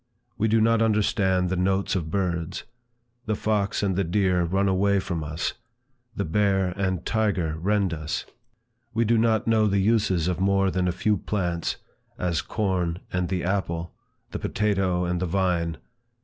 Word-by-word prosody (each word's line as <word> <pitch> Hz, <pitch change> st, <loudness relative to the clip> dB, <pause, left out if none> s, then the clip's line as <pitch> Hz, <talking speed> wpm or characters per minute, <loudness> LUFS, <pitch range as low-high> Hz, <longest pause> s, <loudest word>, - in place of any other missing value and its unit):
We 110 Hz, -, +1 dB
do 110 Hz, +1 st, +3 dB
not 115 Hz, +1 st, +3 dB
understand 100 Hz, -4 st, +2 dB
the 95 Hz, -, 0 dB
notes 95 Hz, +2 st, +1 dB
of 85 Hz, -4 st, -2 dB
birds. 90 Hz, -1 st, -2 dB, 0.6 s
The 110 Hz, -, +1 dB
fox 105 Hz, -1 st, 0 dB
and 95 Hz, -2 st, +1 dB
the 100 Hz, -, +1 dB
deer 90 Hz, 0 st, +1 dB
run 95 Hz, +4 st, +1 dB
away 100 Hz, +1 st, +2 dB
from 85 Hz, -4 st, -3 dB
us; 75 Hz, +3 st, -3 dB, 0.6 s
the 100 Hz, -, -1 dB
bear 95 Hz, +2 st, +2 dB
and 95 Hz, -1 st, -2 dB
tiger 100 Hz, -8 st, 0 dB
rend 100 Hz, 0 st, +1 dB
us. 75 Hz, -1 st, -3 dB, 0.7 s
We 115 Hz, +1 st, +2 dB
do 115 Hz, +1 st, +3 dB
not 110 Hz, +1 st, +2 dB
know 110 Hz, -2 st, +3 dB
the 100 Hz, -1 st, +1 dB
uses 100 Hz, -4 st, +2 dB
of 90 Hz, -1 st, -1 dB
more 95 Hz, 0 st, +2 dB
than 90 Hz, 0 st, 0 dB
a -, -, +2 dB
few 100 Hz, +4 st, +1 dB
plants, 90 Hz, -4 st, -2 dB, 0.4 s
as 85 Hz, -3 st, 0 dB
corn 90 Hz, -5 st, -1 dB, 0.2 s
and 90 Hz, -1 st, 0 dB
the 90 Hz, -3 st, -1 dB
apple, 85 Hz, -3 st, -2 dB, 0.4 s
the -, -, -4 dB
potato 95 Hz, -4 st, 0 dB
and 90 Hz, 0 st, -1 dB
the 90 Hz, -, -1 dB
vine. 85 Hz, -2 st, 0 dB
95 Hz, 165 wpm, -25 LUFS, 90-105 Hz, 0.7 s, do